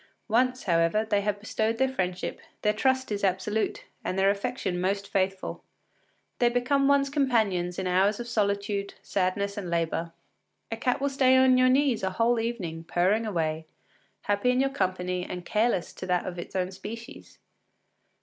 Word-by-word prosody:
Once, 255 +3 +2
however, 170 +4 +2
they 205 -2 +1
have 205 0 -1
bestowed 220 +1 -1
their 265 - +3
friendship, 185 -9 -3 0.2
their 210 - +3
trust 260 +2 +1
is 205 -1 -2
absolute, 195 +3 0 0.2
and 185 - -2
their 195 +1 +4
affection 200 -4 -2
most 200 +2 -1
faithful. 190 -1 -2 0.8
They 240 - +4
become 260 +3 +2
one’s 280 -1 +3
companions 220 - +1
in 190 - -2
hours 190 +4 +2
of 240 - -5
solitude, 200 -2 -1
sadness, 200 +1 -1
and 190 -4 -4
labour. 165 0 -1 0.6
A 225 - -2
cat 250 +2 0
will 280 - +1
stay 260 -1 +4
on 260 0 +6
your 255 0 +5
knees 265 -2 +3
a 190 - 0
whole 230 +5 +2
evening, 190 -9 -3
purring 190 +7 +1
away, 160 -4 -2 0.5
happy 205 +4 +1
in 250 0 +2
your 270 +1 +2
company 180 -5 -1
and 180 0 -6
careless 215 -4 0
of 185 - -4
that 180 -1 +1
of 180 -1 -5
its 175 - -8
own 185 0 0
species. 220 +5 -9
205 Hz, 170 wpm, -27 LUFS, 185-245 Hz, 0.8 s, on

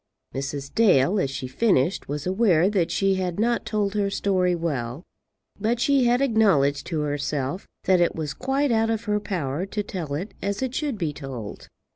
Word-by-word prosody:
Mrs. 140 +1 -4
Dale, 195 -4 +4
as 140 - 0
she 135 -1 -5
finished, 170 - +1
was 145 0 -3
aware 190 -2 +3
that 185 -5 +1
she 195 -1 +2
had 180 0 -3
not 235 +2 +1
told 205 -2 0
her 205 -1 +1
story 185 -2 +1
well, 145 -4 -3 0.6
but 225 +3 0
she 275 0 +3
had 245 +3 +3
acknowledged 190 - +3
to 160 -4 -1
herself 145 +2 -2 0.2
that 185 -2 +3
it 175 - +2
was 150 -3 -3
quite 270 - 0
out 225 0 +2
of 225 -1 -1
her 210 -1 0
power 170 -7 -3
to 210 +1 -3
tell 170 -8 -4
it 185 +8 -5
as 200 +5 -2
it 255 -1 -2
should 290 -5 -2
be 165 -6 -2
told. 130 -7 -7
185 Hz, 185 wpm, -24 LUFS, 145-215 Hz, 0.6 s, Dale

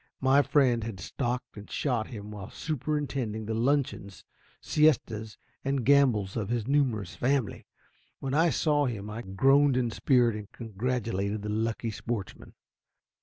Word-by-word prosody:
My 135 +2 +5
friend 130 -6 +2
had 110 -4 -6
stalked 125 +6 -3
and 105 - -10
shot 120 -6 -1
him 105 -3 -8
while 100 -2 -8
superintending 140 -7 -3
the 110 - -2
luncheons, 120 -5 -1 0.3
siestas 115 -8 +1 0.3
and 135 -3 -1
gambols 125 -9 +3
of 110 -3 -2
his 120 -2 -1
numerous 125 -9 0
family. 130 -3 -1 0.5
When 135 0 -3
I 165 +3 +4
saw 145 0 +2
him 105 -3 -5
I 110 +2 -5
groaned 135 +7 +3
in 120 -2 0
spirit, 120 -2 +3
and 105 -1 -8
congratulated 110 -3 -2
the 105 - -4
lucky 115 +1 -1
sportsman. 110 -1 -6
120 Hz, 140 wpm, -28 LUFS, 105-135 Hz, 0.5 s, My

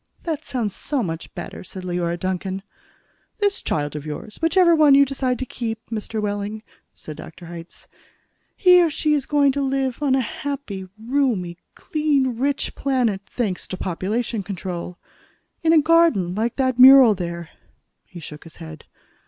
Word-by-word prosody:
"That 315 -3 -3
sounds 230 -9 -3
so 280 -5 -2
much 165 -3 -5
better," - - -7
said 185 0 -9
Leora 175 -1 -2
Duncan. 190 +1 -3 0.7
"This 405 -2 0
child 145 -1 -2
of 150 - -5
yours 155 +8 -7
whichever 340 +1 +4
one 300 -3 +6
you 280 0 +6
decide 260 -2 -1
to 260 - -4
keep, 225 -3 -4
Mr. 220 0 -3
Wehling," 205 +1 -3 0.3
said 155 - -9
Dr. 175 +2 -11
Hitz. 170 0 -10 0.7
"He 360 -2 +6
or 335 - +3
she 305 0 0
is 285 -3 0
going 285 -2 +3
to 280 +1 -2
live 270 -1 -1
on 275 -3 +2
a - - +2
happy, 230 -6 -5
roomy, 225 -8 -1 0.2
clean, 280 -6 0
rich 280 +1 -1
planet, 250 -8 0
thanks 210 -7 -3
to 185 - -5
population 210 +6 -2
control. 180 -2 -6 0.6
In 325 - +3
a 325 - +7
garden 315 - +3
like 225 +4 -1
that 260 -2 0
mural 260 -3 +9
there." 170 -3 -5 0.5
He 175 - -12
shook 150 -1 -10
his 165 - -13
head. 160 -2 -10
230 Hz, 160 wpm, -22 LUFS, 185-280 Hz, 0.7 s, mural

